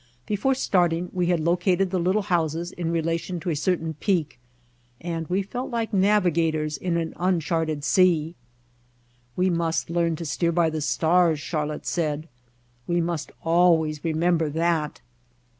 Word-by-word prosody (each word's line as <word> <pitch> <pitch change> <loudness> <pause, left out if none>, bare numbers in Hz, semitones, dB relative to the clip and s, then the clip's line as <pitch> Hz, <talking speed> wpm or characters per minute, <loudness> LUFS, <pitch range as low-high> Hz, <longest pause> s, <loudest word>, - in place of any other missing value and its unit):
Before 215 +6 0
starting 175 -7 +1
we 180 -2 0
had 175 -1 +2
located 180 +3 +1
the 185 - 0
little 185 +4 +1
houses 170 -2 -1
in 170 -2 -3
rela 165 0 0
tion 180 0 -5
to 175 - -2
a - - -1
certain 165 0 -1
peak 160 -4 -1 0.6
and 165 -1 -4
we 190 +2 0
felt 245 +6 -5
like 230 -3 -2
navigators 170 -6 +2
in 175 +1 -1
an 165 -1 -2
uncharted 165 -4 0
sea. 170 -2 +3 1.0
"We 185 0 +2
must 165 -1 -1
learn 170 -1 +1
to 165 - -6
steer 170 +3 0
by 165 -1 +2
the 155 0 -3
stars," 160 +1 +2
Char 150 0 -2
lotte 150 - -6
said. 155 -2 -2 0.6
"We 175 0 +1
must 170 -2 -2
always 165 -3 +3
remember 165 0 +1
that." 160 -1 -1
170 Hz, 155 wpm, -24 LUFS, 160-180 Hz, 1.0 s, sea